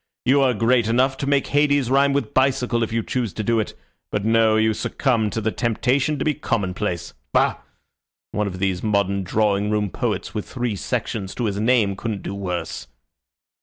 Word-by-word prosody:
You 135 +3 +4
are 130 -3 +3
great 115 +1 +2
enough 130 +4 +2
to 140 - -3
make 140 -1 +2
Hades 145 -3 +2
rhyme 140 +1 +4
with 140 -6 -1
bicycle 130 -3 +2
if 115 - -1
you 115 0 0
choose 120 -6 -2
to 110 - -3
do 115 +2 +2
it 110 - -3 0.4
but 105 0 -1
no, 115 -1 +4
you 110 0 +3
succumb 115 -1 0
to 110 - -3
the 110 0 -1
temptation 130 +6 0
to - - -2
be 155 - +2
commonplace. 95 - -2 0.2
Bah! - - +3 0.7
One 105 -1 -1
of 95 -2 -5
these 95 -1 -1
modern 100 -2 +1
drawing 105 +1 +1
room 105 -2 0
poets - - -2
with 105 - -4
three 120 -4 -2
sections 95 0 -3
to 120 - -2
his 100 -2 -1
name 110 -3 +2
couldn't 105 -1 -4
do - - -4
worse." 90 -10 -4
110 Hz, 190 wpm, -22 LUFS, 100-130 Hz, 0.7 s, You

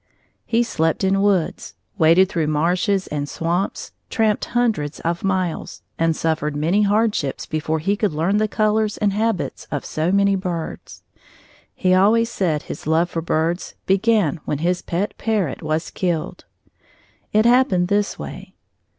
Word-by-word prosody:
He 235 +1 +2
slept 165 -5 0
in 195 +1 +2
woods, 195 -5 0 0.2
waded 165 +4 +5
through 165 -4 -1
marshes 180 +6 +1
and 145 -1 -4
swamps, 175 +4 -2 0.2
tramped 220 -2 +1
hundreds 220 -12 -1
of 170 +1 -2
miles, 185 -3 -2 0.2
and 165 -1 +2
suffered 155 -2 -1
many 165 +8 +2
hardships 205 -8 +1
before 155 0 -2
he 195 +6 0
could 205 -2 0
learn 165 +7 +1
the 215 0 +2
colors 215 0 +1
and 205 -2 +1
habits 220 -2 -2
of 145 - -3
so 160 +3 -1
many 200 0 +3
birds. 175 -4 -5 0.7
He 185 -1 +2
always 220 +5 +4
said 160 -6 -1
his 145 - -8
love 165 +2 +2
for 165 - -2
birds 165 +2 -1
began 195 -4 +2
when 145 - -2
his 175 +4 0
pet 185 +5 -2
parrot 210 - -1
was 155 +1 -2
killed. 175 -4 -3 0.9
It 215 +1 +3
happened 235 -8 +4
this 205 +1 0
way. - - -9
185 Hz, 150 wpm, -21 LUFS, 160-205 Hz, 0.9 s, waded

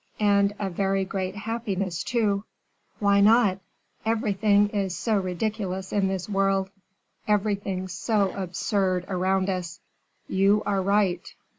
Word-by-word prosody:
"And 200 -1 +3
a 200 - -2
very 195 +1 0
great 190 0 -3
happiness, 205 -5 -3
too." 210 -4 0 0.5
"Why 200 -1 +3
not? 210 -3 +4 0.4
Everything 205 -2 +2
is 195 -3 -2
so 220 -3 +1
ridiculous 190 0 -3
in 200 -2 +2
this 190 -2 -3
world, 195 -1 +1 0.6
everything 200 -3 0
so 200 +2 0
absurd 185 0 -1
around 190 0 0
us." 180 -2 -3 0.5
"You 200 +2 +3
are 195 -1 +1
right." 190 -2 +1
195 Hz, 120 wpm, -25 LUFS, 190-205 Hz, 0.6 s, not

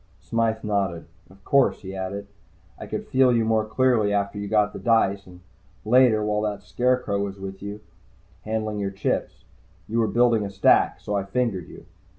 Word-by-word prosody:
Smythe 115 -1 -1
nodded. 100 -6 -1 0.2
"Of 95 0 -20
course," 140 -2 +3
he 95 0 -7
added. 95 +2 -4 0.5
"I - - -8
could - - -4
feel 130 -1 +4
you 115 -2 +2
more 110 -1 +1
clearly 115 -2 +2
after 100 0 -1
you 100 - -4
got 105 0 +2
the - - -7
dice, 100 -4 +1
and 90 0 -14 0.4
later, 115 -2 +4
while 105 0 0
that 105 -2 -3
scarecrow 125 -5 0
with 100 -1 -5 0.2
you 100 +1 -5
was 105 - -12 0.6
handling 110 -1 -3
your 100 -1 -1
chips. 95 0 -3 0.4
You 115 +2 -1
were 115 - +2
building 120 -1 +3
a 100 - -4
stack. 100 0 +3
So 105 - -4
I 100 - 0
fingered 100 -4 -2
you." - - -13
105 Hz, 180 wpm, -24 LUFS, 100-115 Hz, 0.6 s, feel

